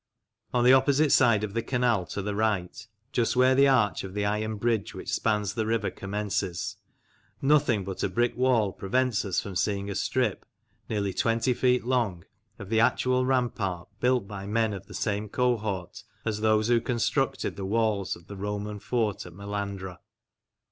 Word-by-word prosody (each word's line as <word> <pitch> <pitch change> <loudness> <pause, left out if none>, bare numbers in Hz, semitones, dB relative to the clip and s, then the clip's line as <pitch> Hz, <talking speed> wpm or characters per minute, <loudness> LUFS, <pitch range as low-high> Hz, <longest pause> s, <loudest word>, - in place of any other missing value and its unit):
On 120 - +2
the 125 +1 +7
opposite 140 +2 +4
side 115 -5 +5
of 105 -2 -3
the 115 - 0
canal 120 -7 +1
to 100 +5 -4
the 105 +1 -2
right, 105 -1 -1 0.2
just 120 -4 +1
where 130 +1 +5
the 140 +1 +5
arch 120 -7 +2
of 95 0 -8
the 105 0 0
iron 105 +1 -1
bridge 115 -1 -1
which - - -5
spans 105 -2 0
the 110 -1 -2
river 110 -2 0
commences, 100 -3 -3 0.6
nothing 140 -7 +3
but 95 -1 -5
a - - 0
brick 120 +5 0
wall 120 -6 +2
prevents 125 +3 0
us 95 -3 0
from 100 -2 -6
seeing 100 +1 -1
a - - -2
strip, 115 +2 0 0.5
nearly 100 -3 -1
twenty 115 +5 +1
feet 125 0 +2
long, 115 -9 0 0.3
of 100 -3 -9
the 110 0 +2
actual 125 +2 +2
rampart, 100 -9 -1
built 125 -4 +2
by 100 -1 -7
men 110 0 +1
of 95 - -8
the - - -10
same 105 0 -2
cohort 110 -5 -1 0.2
as 105 -2 -2
those 110 0 +3
who 120 -1 +3
constructed 120 -1 -1
the 100 - -6
walls 105 -1 0
of 85 - -16
the 100 - -9
Roman 105 +1 -4
fort 105 -4 -1
at 85 - -12
Melandra. 100 -1 -5
110 Hz, 175 wpm, -27 LUFS, 100-120 Hz, 0.6 s, the